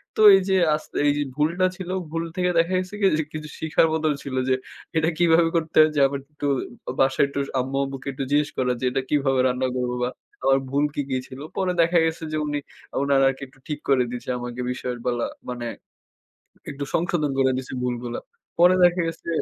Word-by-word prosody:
তো -, -, +1 dB
এই 195 Hz, -, +3 dB
যে, 190 Hz, -, +3 dB, 0.2 s
আস 155 Hz, -, -5 dB, 0.2 s
এই 145 Hz, -, +5 dB
যে, -, -, 0 dB
ভুলটা 170 Hz, +5 st, +1 dB
ছিল, 185 Hz, -2 st, -7 dB, 0.2 s
ভুল 165 Hz, +1 st, -2 dB
থেকে 180 Hz, -1 st, +1 dB
দেখা 170 Hz, +3 st, +1 dB
গেছে 185 Hz, +2 st, -5 dB
কি 195 Hz, -, +5 dB, 0.3 s
কিছু 155 Hz, -1 st, -6 dB
শিখার 160 Hz, +1 st, +3 dB
মত 160 Hz, 0 st, -1 dB, 0.2 s
ছিল 135 Hz, -2 st, -5 dB
যে, 130 Hz, -, +4 dB, 0.4 s
এটা 160 Hz, +1 st, +3 dB
কিভাবে 170 Hz, -1 st, +4 dB
করতে 160 Hz, -1 st, -1 dB
হয় 155 Hz, -, +6 dB
যে, 145 Hz, -, +2 dB
আমার 140 Hz, 0 st, -4 dB
একটু 145 Hz, -, -5 dB, 0.5 s
বাসায় 135 Hz, +1 st, +4 dB
একটু 140 Hz, -, -4 dB, 0.2 s
আম্মু 135 Hz, +2 st, -2 dB
আম্মুকে 135 Hz, -1 st, -6 dB
একটু 135 Hz, -, -4 dB
জিজ্ঞেস 145 Hz, 0 st, +3 dB
করা 125 Hz, -1 st, +1 dB
যে, -, -, -8 dB
‘’এটা 135 Hz, +1 st, 0 dB
কিভাবে 135 Hz, -3 st, +2 dB
রান্না 125 Hz, +1 st, 0 dB
করব 125 Hz, -1 st, -1 dB
বা 125 Hz, -, +1 dB, 0.3 s
আমার 135 Hz, 0 st, +4 dB
ভুল 140 Hz, +2 st, +2 dB
কি, -, -, 0 dB
কি 130 Hz, -, 0 dB
ছিল?‘’ 130 Hz, +1 st, -10 dB, 0.2 s
পরে 190 Hz, -1 st, +1 dB
দেখা 170 Hz, +1 st, +3 dB
গেছে 160 Hz, +1 st, -2 dB
যে, 155 Hz, -, -1 dB
উনি 145 Hz, 0 st, -1 dB, 0.4 s
উনার 140 Hz, -1 st, +3 dB
আরকি 135 Hz, 0 st, -1 dB
একটু 130 Hz, +1 st, -24 dB
ঠিক 150 Hz, -1 st, -3 dB
করে 135 Hz, -2 st, +4 dB
দিয়েছে 125 Hz, +1 st, -6 dB
আমাকে 120 Hz, 0 st, -5 dB
বিষয় 125 Hz, 0 st, -4 dB
বলা 120 Hz, -1 st, 0 dB, 0.2 s
মানে 120 Hz, -1 st, -4 dB, 1.1 s
একটু 140 Hz, 0 st, -5 dB
সংশোধন 160 Hz, -3 st, +1 dB
করে 130 Hz, 0 st, +4 dB
দিছে 130 Hz, -, -7 dB
ভুলগুলা। 120 Hz, -1 st, -3 dB, 0.4 s
পরে 180 Hz, +1 st, +6 dB
দেখা 175 Hz, +1 st, +4 dB
গেছে 165 Hz, 0 st, -6 dB
145 Hz, 205 wpm, -24 LUFS, 130-165 Hz, 1.1 s, হয়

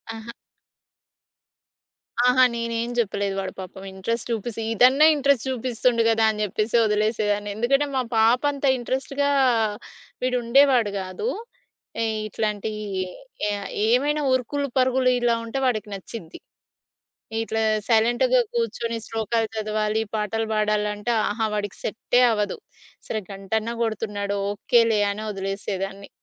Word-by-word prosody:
ఆహ! 225 Hz, +1 st, -10 dB, 2.0 s
ఆహా! 255 Hz, +1 st, +5 dB
నేనేం 230 Hz, 0 st, -2 dB
జేప్పలేదు. 200 Hz, -3 st, 0 dB
వాడు 190 Hz, -1 st, -4 dB
పాపం 190 Hz, +1 st, -8 dB
ఇంట్రెస్ట్ 230 Hz, +5 st, -3 dB
చూపిసి 225 Hz, 0 st, -3 dB
ఇదన్నా 260 Hz, +7 st, +6 dB
ఇంట్రెస్ట్ 280 Hz, -4 st, +2 dB
చూపిస్తుండు 245 Hz, -1 st, +1 dB
గదా! 225 Hz, 0 st, +3 dB
అని 215 Hz, -, -5 dB
జెప్పేసి 215 Hz, +3 st, -1 dB
వదిలేసేదాన్ని. 210 Hz, -1 st, 0 dB
ఎందుకంటే 275 Hz, +6 st, +2 dB
మా 260 Hz, -, +2 dB, 0.2 s
పాప 225 Hz, +3 st, +4 dB
అంత 280 Hz, 0 st, -4 dB
ఇంట్రెస్ట్‌గా 270 Hz, +3 st, -1 dB, 0.9 s
వీడు 250 Hz, 0 st, +1 dB
ఉండేవాడు 250 Hz, -3 st, +4 dB
గాదు. 190 Hz, -, -3 dB, 0.7 s
ఏయ్ 220 Hz, -1 st, -1 dB
ఇట్లాంటియి 215 Hz, 0 st, -3 dB, 0.7 s
ఎ -, -, 0 dB, 0.4 s
ఏమైనా 290 Hz, +6 st, +2 dB
ఉరుకులు 280 Hz, +3 st, -1 dB
పరుగులు 255 Hz, 0 st, +3 dB
ఇలా 240 Hz, -1 st, +2 dB
ఉంటే 230 Hz, +4 st, -3 dB
వాడికి 215 Hz, -4 st, 0 dB
నచ్చిది. 190 Hz, -3 st, -9 dB, 1.0 s
ఇట్లా 225 Hz, 0 st, -2 dB, 0.3 s
సైలెంట్‌గా 240 Hz, -, +3 dB
కూర్చొని 240 Hz, -, -2 dB
శ్లోకాలు 225 Hz, 0 st, -1 dB
చదవాలి, 215 Hz, 0 st, 0 dB
పాటలు 220 Hz, +1 st, -1 dB
బాడాలంటే 210 Hz, +1 st, 0 dB, 0.2 s
ఆహా! 220 Hz, +1 st, -1 dB
వాడికి 205 Hz, -1 st, -3 dB
సె‌ట్టే 240 Hz, +3 st, +1 dB
అవ్వదు. 210 Hz, -2 st, -1 dB, 0.5 s
సరే 215 Hz, -, -2 dB
గంటన్నా 215 Hz, +4 st, -3 dB
కొడుతున్నాడు 205 Hz, -2 st, -2 dB, 0.2 s
ఓకేలే 225 Hz, 0 st, +3 dB
అని 210 Hz, +2 st, -5 dB
వదిలేసేదాన్ని. 195 Hz, 0 st, -4 dB
225 Hz, 115 wpm, -24 LUFS, 210-245 Hz, 2.0 s, ఇదన్నా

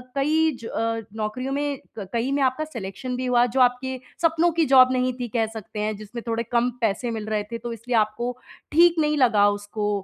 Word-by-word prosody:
कई 310 Hz, +3 st, +2 dB
ज -, -, -9 dB
अ, 225 Hz, 0 st, -2 dB, 0.2 s
नौकरियों 220 Hz, +5 st, -3 dB
में, 285 Hz, 0 st, -1 dB, 0.2 s
क 200 Hz, -3 st, -6 dB
कई 235 Hz, +3 st, 0 dB
में 280 Hz, 0 st, +1 dB
आपका 260 Hz, +4 st, +1 dB
सिलेक्शन 250 Hz, -1 st, -6 dB
भी 255 Hz, +1 st, -3 dB
हुआ, 245 Hz, -1 st, +4 dB
जो 250 Hz, +2 st, -2 dB
आपके 255 Hz, +1 st, +1 dB, 0.2 s
सपनों 330 Hz, +1 st, +3 dB
की 330 Hz, 0 st, +2 dB
जॉब 255 Hz, -2 st, +6 dB
नहीं 255 Hz, 0 st, +1 dB
थी, 245 Hz, -, -2 dB
कह 230 Hz, -1 st, 0 dB
सकते 215 Hz, -1 st, -7 dB
हैं, 215 Hz, +1 st, -1 dB
जिसमें 215 Hz, +3 st, -8 dB
थोड़े 230 Hz, 0 st, -1 dB
कम 240 Hz, 0 st, +2 dB
पैसे 230 Hz, +2 st, 0 dB
मिल 220 Hz, -2 st, -4 dB
रहे 210 Hz, -1 st, 0 dB
थे, 230 Hz, -, -3 dB
तो 235 Hz, +1 st, -6 dB
इसलिए 235 Hz, +2 st, -3 dB
आपको 230 Hz, +3 st, 0 dB, 0.3 s
ठीक 340 Hz, +2 st, +6 dB
नहीं 300 Hz, -1 st, +2 dB
लगा 225 Hz, -6 st, +4 dB
उसको 205 Hz, +1 st, -3 dB
245 Hz, 215 wpm, -24 LUFS, 220-270 Hz, 0.3 s, जॉब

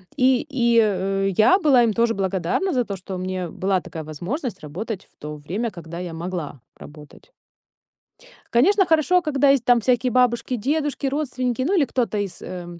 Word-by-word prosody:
И 255 Hz, -1 st, +3 dB
и 235 Hz, -4 st, +3 dB
о 195 Hz, -2 st, +1 dB
я 215 Hz, -, +4 dB
была 280 Hz, -8 st, +5 dB
им 225 Hz, -2 st, +2 dB
тоже 230 Hz, +1 st, +2 dB
благодарна 190 Hz, -, -1 dB
за 250 Hz, -2 st, +1 dB
то, 200 Hz, -, -4 dB
что 190 Hz, 0 st, -7 dB
у -, -, -4 dB
меня 185 Hz, -1 st, -4 dB
была 190 Hz, +1 st, -1 dB
такая 165 Hz, -3 st, -8 dB
возможность 200 Hz, -, -5 dB
работать 190 Hz, +7 st, -6 dB
в -, -, -32 dB
то 150 Hz, 0 st, -6 dB
время, 190 Hz, +11 st, -3 dB
когда 170 Hz, -3 st, -9 dB
я 175 Hz, -2 st, -5 dB
могла 165 Hz, -6 st, -5 dB, 0.2 s
работать. 150 Hz, -, -14 dB, 1.2 s
Конечно, 380 Hz, -, +4 dB
хорошо, 330 Hz, +3 st, +3 dB
когда 285 Hz, -4 st, +2 dB
есть 275 Hz, -4 st, +3 dB
там 245 Hz, -1 st, +5 dB
всякие 245 Hz, +1 st, +1 dB
бабушки, 250 Hz, 0 st, +1 dB
дедушки, 290 Hz, +5 st, -1 dB
родственники, 255 Hz, -3 st, -2 dB
ну, 350 Hz, +10 st, +1 dB
или 295 Hz, -, +4 dB
кто-то 240 Hz, -5 st, -1 dB
из, 200 Hz, -3 st, -4 dB
э, 180 Hz, -1 st, -7 dB
230 Hz, 180 wpm, -22 LUFS, 185-265 Hz, 1.2 s, была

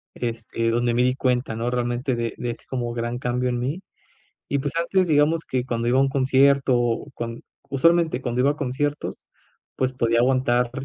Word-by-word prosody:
este, 115 Hz, -1 st, -2 dB
donde 120 Hz, 0 st, +1 dB
me 125 Hz, -, +3 dB
di 125 Hz, -, +3 dB
cuenta, 125 Hz, -3 st, 0 dB
¿no?, 115 Hz, +2 st, -2 dB
realmente 125 Hz, +1 st, -1 dB
de 115 Hz, -1 st, -2 dB
de 120 Hz, -, -3 dB
este 115 Hz, -, -11 dB
como 120 Hz, -2 st, -3 dB
gran 120 Hz, +1 st, -3 dB
cambio 125 Hz, 0 st, -1 dB
en 120 Hz, -1 st, -1 dB
mí. 145 Hz, +10 st, -3 dB, 0.7 s
Y 140 Hz, -, 0 dB
pues, 145 Hz, +2 st, -3 dB
antes 180 Hz, +2 st, +2 dB
digamos 155 Hz, +1 st, +2 dB
que 125 Hz, -1 st, -1 dB
cuando 120 Hz, -2 st, -2 dB
iba 125 Hz, +2 st, +3 dB
a -, -, +5 dB
un 135 Hz, -, +2 dB
concierto 130 Hz, -3 st, +3 dB
cuan 115 Hz, 0 st, -6 dB, 0.3 s
usualmente 165 Hz, +2 st, +3 dB
cuando 125 Hz, -1 st, -1 dB
iba 140 Hz, -, +4 dB
a 145 Hz, -, -2 dB
conciertos, 145 Hz, +1 st, -3 dB, 0.5 s
pues, 130 Hz, 0 st, 0 dB
podía 115 Hz, -2 st, +1 dB
aguantar 125 Hz, -1 st, +2 dB
125 Hz, 190 wpm, -23 LUFS, 120-140 Hz, 0.7 s, a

